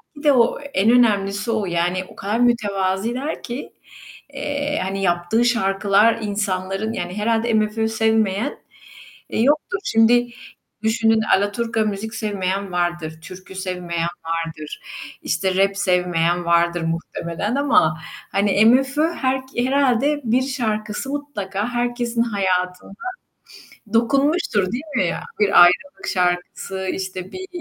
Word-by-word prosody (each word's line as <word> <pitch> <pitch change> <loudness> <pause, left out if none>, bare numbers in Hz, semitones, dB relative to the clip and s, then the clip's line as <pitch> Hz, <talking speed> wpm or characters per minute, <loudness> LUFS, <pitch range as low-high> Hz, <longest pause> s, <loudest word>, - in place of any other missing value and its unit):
belki 290 - -11
de 290 - +7
o 240 -2 +3
en 230 -7 +1
önemlisi 210 -2 +2
o, 220 -3 0
yani, 175 +1 -1
o - - -15
kadar 210 +4 -2
mütevaziler 230 +3 0
ki. 240 +3 -6 0.6
Eee, 285 +1 -2
hani, 195 +1 -3
yaptığı 175 +6 +1
şarkılar, 205 -1 +3
insanların 200 0 -2
yani, 180 0 -4
herhâlde 225 +2 +1
MFÖ 215 +1 +1
sevmeyen, 220 +1 0 0.7
eee, - - -2
yoktur. 300 - +2
Şimdi 240 +2 +4 0.5
düşünün 225 0 +3 0.2
alaturka 220 +3 -1
müzik 215 +2 -4
sevmeyen 200 -2 -2
vardır, 175 -3 -2
türkü 185 +3 -11
sevmeyen 180 -3 -3 0.2
vardır, 165 -2 -4 0.4
işte, 185 +3 -1
rap 195 +1 +2
sevmeyen 180 -3 +1
vardır 170 0 +2
muhtemelen 170 +5 -3
ama 160 - +3 0.7
MFÖ 270 +7 +3
herke 260 -3 -1
herhâlde 280 +2 +2
bir 240 +2 +2
şarkısı 220 -2 -2
mutlaka 220 -8 -3
herkesin 240 -1 -1
hayatına 185 -5 -1 1.0
dokunmuştur, 255 - +2
değil 255 +5 -3
mi 185 - +2
ya? - - -2 0.2
Bir 200 -3 +7
ayrılık 190 +11 +2
şarkısı, 180 +1 -1
işte 185 0 -5
bir 375 0 -6
210 Hz, 115 wpm, -21 LUFS, 185-240 Hz, 1.0 s, de